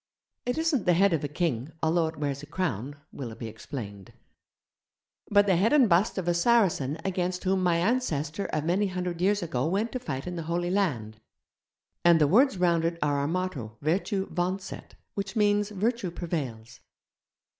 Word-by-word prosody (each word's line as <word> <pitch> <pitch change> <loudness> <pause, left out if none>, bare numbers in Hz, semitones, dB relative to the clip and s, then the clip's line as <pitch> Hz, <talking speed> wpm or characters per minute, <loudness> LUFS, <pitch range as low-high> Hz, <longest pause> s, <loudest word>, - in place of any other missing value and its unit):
'It 245 - 0
isn't 320 - 0
the 175 - +5
head 195 +1 +4
of 155 - 0
a - - 0
king, 150 -3 -2
although 160 +1 +2
it 160 - -7
wears 140 -2 -2
a 150 - -10
crown,' 145 - -3 0.2
Willoughby 115 -3 -7
explained, 110 - -8 1.2
'but 205 0 +5
the 190 -3 +3
head 215 +9 +3
and 275 -5 +6
bust 190 +4 +2
of 185 -2 -2
a 175 - +3
Saracen 170 - +2
against 180 -1 -1
whom 190 0 +1
my 175 -2 +3
ancestor 175 - 0
of 155 0 -2
many 190 +5 +2
hundred 180 -2 -3
years 200 +1 +2
ago 140 -4 -1
went 205 +7 0
to 255 - -3
fight 135 - -5
in 180 -1 -5
the - - -3
Holy 175 +1 0
Land. 120 - -1 0.8
And 170 -1 +6
the 150 - +5
words 250 - +4
cut 180 - -2
round 170 -2 +3
it 170 0 -1
are 145 -1 +1
our 140 - 0
motto, 160 -11 -3
"Vertue 190 +5 0
vauncet", 185 +2 -3 0.2
which 195 -1 -4
means 205 -1 +2
virtue 215 0 -1
prevails.' 135 -10 -5
175 Hz, 180 wpm, -27 LUFS, 145-195 Hz, 1.2 s, and